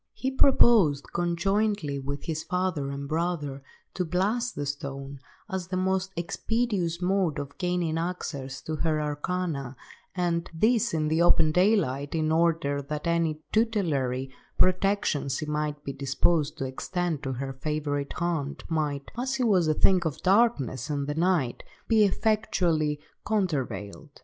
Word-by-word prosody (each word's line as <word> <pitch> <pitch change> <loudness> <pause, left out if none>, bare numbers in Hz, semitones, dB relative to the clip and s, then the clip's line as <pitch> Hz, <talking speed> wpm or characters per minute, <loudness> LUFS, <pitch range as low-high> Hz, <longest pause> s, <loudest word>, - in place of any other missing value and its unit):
He 265 - -2
proposed, 230 - +4
conjointly 175 -2 0
with 140 +1 -5
his 160 -1 -3
father 180 -6 -1
and 140 0 -5
brother, 155 -3 -2 0.3
to 185 - -1
blast 205 +8 0
the 145 - -3
stone, 140 0 -5 0.3
as 190 -4 -4
the 185 0 -2
most 190 +1 0
expeditious 180 -1 -1
mode 185 -3 +1
of 145 0 -5
gaining 175 -3 0
access 140 -6 -4
to 155 0 -3
her 155 -1 +1
arcana, 150 -2 -2 0.4
and, 170 -2 0
this 220 +1 +2
in 155 -1 +1
the 160 +2 +2
open 160 -2 +5
daylight, 165 -7 +2
in 155 -1 +1
order 160 -3 +2
that 150 +1 -5
any 165 -2 0
tutelary 145 - 0 0.3
protection 185 -6 +2
she 135 +3 -2
might 150 0 -2
be 140 - -4
disposed 145 +3 +1
to 135 - -2
extend 160 +4 -2
to 135 -2 -3
her 135 +2 -4
favourite 145 0 -2
haunt 165 -5 -2
might, 150 -4 -2
as 260 +2 -1
she 260 - 0
was 190 -8 +3
a 155 - +2
thing 185 +2 +4
of 160 -2 -3
darkness 185 - +2
and 140 -1 -1
the 145 - -2
night, 165 -6 +1 0.3
be 220 -2 +5
effectually 175 -8 +1 0.2
countervailed. 145 - -2
160 Hz, 145 wpm, -27 LUFS, 145-185 Hz, 0.4 s, open